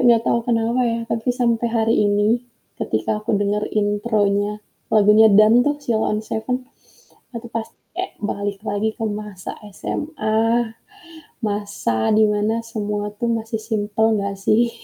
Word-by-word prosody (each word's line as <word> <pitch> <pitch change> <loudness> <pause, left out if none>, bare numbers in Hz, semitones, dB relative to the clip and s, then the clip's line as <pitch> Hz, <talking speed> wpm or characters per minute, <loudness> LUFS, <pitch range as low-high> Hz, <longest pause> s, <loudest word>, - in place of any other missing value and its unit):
Gak 230 -1 +5
tau 235 - +2
kenapa 230 +1 +1
ya, 230 0 -1
tapi 230 +1 -2
sampai 235 -2 +1
hari 225 0 +2
ini 205 +3 +2 0.4
ketika 110 0 -1
aku 215 +2 -4
denger 205 +1 0
intronya 205 -1 +1 0.3
lagunya 215 +1 +7
"Dan" 215 +4 +7
tuh 290 0 +2
Sheila 220 -4 +1
on - - -2
7, 220 0 -4 0.9
itu 235 +1 -8
pas 225 -1 -1 0.3
kek 370 +1 -2
balik 205 -1 -3
lagi 205 +2 0
ke - - -10
masa 210 -3 -6 0.3
SMA, 230 -5 0 0.7
masa 200 - -1
di 220 - +6
mana 210 +1 +1
semua 210 -2 -3
tuh 235 - -1
masih 220 0 -4
simpel 215 0 0
gak 200 0 -2
sih. 225 +4 +2
215 Hz, 140 wpm, -21 LUFS, 205-230 Hz, 0.9 s, lagunya